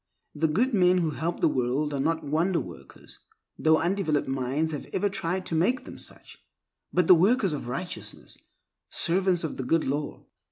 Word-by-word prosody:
The 160 +2 +1
good 235 - +1
men 180 -2 +4
who 165 -3 +1
help 165 +4 -3
the - - +5
world 135 +2 0
are 140 - -2
not 160 +4 0
wonder 165 +5 +1
workers, 70 -7 -11 0.4
though 160 0 +4
undeveloped 170 -4 0
minds 135 +4 -1
have 150 - -6
ever 205 +2 +1
tried 185 0 -2
to - - -4
make 210 +11 +1
them - - -9
such—but 180 - -5
the 180 - +8
workers 195 +2 +3
of 140 - -5
righteousness, 135 +9 -6 0.5
servants 180 0 +2
of 160 - -4
the 130 - -3
Good 160 +6 +1
Law. 145 +2 -3
160 Hz, 170 wpm, -27 LUFS, 145-180 Hz, 0.5 s, the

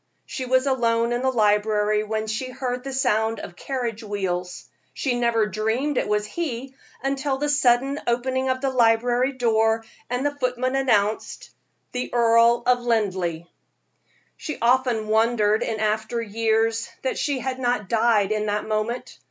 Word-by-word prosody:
She 260 -2 -5
was 260 +1 +3
alone 235 -3 +1
in 240 - -1
the 260 - +2
library 210 -2 +2
when 215 0 -2
she 220 +4 -3
heard 250 -1 -4
the 270 - -5
sound 225 -4 +1
of 175 - -9
carriage 235 -1 -4
wheels; 185 -4 -3 0.3
she 245 -3 -1
never 235 -2 +2
dreamed 220 +8 -1
it - - 0
was 210 0 0
he 265 0 -4 0.4
till 270 0 -1
the 295 +2 -1
sudden 275 0 +2
opening 260 +2 0
of 260 0 -1
the 270 -1 0
library 245 +1 +3
door, 225 -2 +1 0.2
and 250 +3 -1
the 290 - +1
footman 255 -1 -1
announced: 220 -6 0 0.4
"The 250 0 -4
Earl 235 0 +4
of 250 0 +3
Linleigh!" 190 -8 -1 0.9
She 305 - -5
often 240 -2 +2
wondered 220 -1 +2
in 220 -2 -2
after 220 +2 -1
years 225 +1 0
that 260 - -1
she 285 -2 0
had 260 0 -4
not 245 -5 0
died 220 -2 +2
in 215 0 0
that 210 +1 -2
moment. 215 +3 -3
235 Hz, 155 wpm, -23 LUFS, 215-255 Hz, 0.9 s, Earl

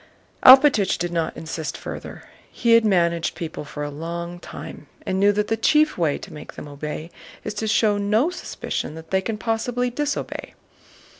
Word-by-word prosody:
Alpátych 260 -6 +7
did 175 0 -2
not 165 -2 -2
insist 160 -1 -5
further. - - -8 0.3
He 235 - 0
had 230 0 +7
managed 170 -5 +1
people 160 -3 -5
for 145 0 -6
a 145 - -4
long 170 +3 -5
time - - -9 0.2
and 190 - -1
knew 200 +1 +5
that 210 +1 0
the 225 - +1
chief 300 +7 +3
way 160 -5 +1
to - - -11
make 150 - -10
them - - -9
obey 150 +3 -6 0.3
is 210 - -4
to 220 +1 -3
show 210 -1 +3
no 215 - +2
suspicion 260 - -5
that 160 0 -11
they 190 0 +2
can 215 +2 -3
possibly 245 +3 -1
disobey. 295 +3 -3
195 Hz, 175 wpm, -23 LUFS, 165-225 Hz, 0.3 s, Alpátych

